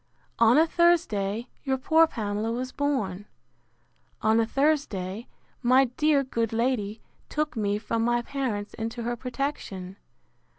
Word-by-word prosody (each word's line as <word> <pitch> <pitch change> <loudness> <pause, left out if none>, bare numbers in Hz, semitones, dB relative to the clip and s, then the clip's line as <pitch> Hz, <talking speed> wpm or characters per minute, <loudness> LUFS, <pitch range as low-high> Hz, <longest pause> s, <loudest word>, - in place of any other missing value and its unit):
—On 230 +3 +6
a 320 - +6
Thursday 245 - +1 0.2
your 265 -2 0
poor 320 +5 +4
Pamela 215 -3 -2
was 255 +2 -3
born. 210 -9 -2 1.0
On 220 +1 +4
a 225 - +2
Thursday 235 -8 0 0.3
my 260 +2 +5
dear 300 -2 +3
good 230 -4 -2
lady 225 -3 -1 0.3
took 305 -1 -2
me 205 -2 0
from 225 +1 -2
my 240 0 +1
parents 235 -7 -3
into 230 +1 -4
her 240 +1 -1
protection. 240 -7 -4
235 Hz, 130 wpm, -26 LUFS, 210-275 Hz, 1.0 s, On